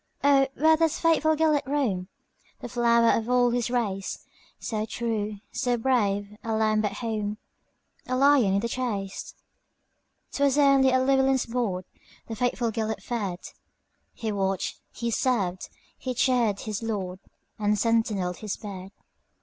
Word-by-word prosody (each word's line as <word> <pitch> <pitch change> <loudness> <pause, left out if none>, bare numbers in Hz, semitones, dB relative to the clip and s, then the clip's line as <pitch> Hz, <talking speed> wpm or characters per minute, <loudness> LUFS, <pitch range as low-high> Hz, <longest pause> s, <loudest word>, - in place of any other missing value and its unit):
"O, 275 -1 +5
where 315 +2 +5
doth 325 -1 +1
faithful 315 -1 +3
Gêlert 305 -3 +2
roam, 240 -11 0 0.5
The - - -7
flower 235 -1 +4
of 225 +1 -2
all 245 -1 +4
his 240 0 0
race, 205 -6 -2 0.3
So 215 -3 -3
true, 215 -3 -2 0.2
so 245 -1 0
brave,—a 210 -3 0
lamb 215 0 +2
at 205 -1 -1
home,A 215 +3 -6
lion 260 -7 +4
in - - +3
the 235 - -1
chase?"'T 230 +4 -7
was 280 0 +3
only 275 -2 +5
at 260 0 +2
Llewelyn's 270 -1 +3
boardThe 225 -1 -5
faithful 245 -1 0
Gêlert 220 -1 -3
fed; 200 -7 -3 0.7
He 220 -2 -4
watched, 195 -2 -2
he 235 0 -3
served, 200 -8 0 0.3
he 255 -1 -4
cheered 235 -5 +2
his 215 -1 -4
lord, 195 -5 -3 0.4
And 210 0 +1
sentineled 210 -5 0
his 215 -3 -4
bed. 195 -2 -8
230 Hz, 135 wpm, -26 LUFS, 205-255 Hz, 0.7 s, O